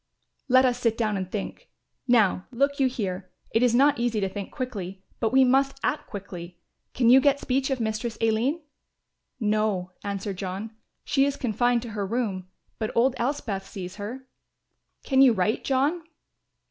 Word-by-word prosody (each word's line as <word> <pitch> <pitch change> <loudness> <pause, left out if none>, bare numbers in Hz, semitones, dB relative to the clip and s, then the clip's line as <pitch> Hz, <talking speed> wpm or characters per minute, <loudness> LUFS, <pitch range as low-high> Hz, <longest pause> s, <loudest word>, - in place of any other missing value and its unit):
"Let 260 0 +5
us 245 -1 +1
sit 230 -2 +1
down 215 -3 0
and 185 -1 -4
think 205 - -5 0.4
Now 215 -6 +3
look 280 +3 0
you 270 - +4
here; 190 -6 -4 0.2
it 225 - +2
is 245 -1 +4
not 280 0 +4
easy 235 -2 0
to 195 - 0
think 200 0 -6
quickly, 195 -8 -5 0.2
but 225 - 0
we 265 +1 +6
must 270 +2 +2
act 300 - -1
quickly. 180 -4 -8 0.4
Can 240 -2 +4
you 265 +1 +8
get 280 0 +3
speech 265 +1 0
of 265 -2 -1
Mistress 225 +1 -2
Aline?" 230 +9 +1 0.8
"No," 210 -4 0
answered 200 -1 -4
John; 195 +4 -5 0.3
"she 275 -1 +2
is 280 0 -1
confined 245 0 +1
to 235 - -7
her 210 -2 -3
room, 195 -3 -2 0.3
but 220 -1 -1
old 250 +3 +4
Elspeth 235 -7 -2
sees 185 -1 -7
her." 245 +6 -7 0.8
"Can 265 -1 +3
you 260 -3 +7
write, 200 +2 0
John?" 280 +6 +1
230 Hz, 170 wpm, -26 LUFS, 200-260 Hz, 0.8 s, you